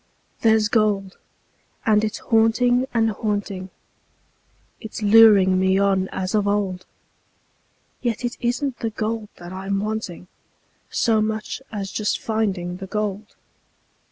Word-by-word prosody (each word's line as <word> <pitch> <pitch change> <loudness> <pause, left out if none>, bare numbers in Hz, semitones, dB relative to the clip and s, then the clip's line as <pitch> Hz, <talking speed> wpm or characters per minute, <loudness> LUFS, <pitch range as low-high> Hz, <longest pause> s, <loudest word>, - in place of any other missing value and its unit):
There's 220 -1 +3
gold, 210 -4 0 0.7
and 215 -1 +3
it's 215 0 -2
haunting 245 +3 +2
and 225 -1 +2
haunting; 205 -3 -3 1.1
It's 220 -1 -7
luring 205 -3 +6
me 190 0 +3
on 195 -1 +2
as 185 +1 -3
of 210 -1 +1
old; 195 -3 -1 1.1
Yet 240 -1 -2
it 240 - -3
isn't 245 +2 -1
the 225 - -1
gold 220 0 -3
that 175 +1 -10
I'm 195 +1 -2
wanting 210 -4 -4 0.6
So 220 -2 +2
much 215 +3 -3
as 200 -3 -4
just 210 -1 -1
finding 195 -5 -2
the 190 0 -8
gold. 210 +1 -4
210 Hz, 125 wpm, -22 LUFS, 195-225 Hz, 1.1 s, luring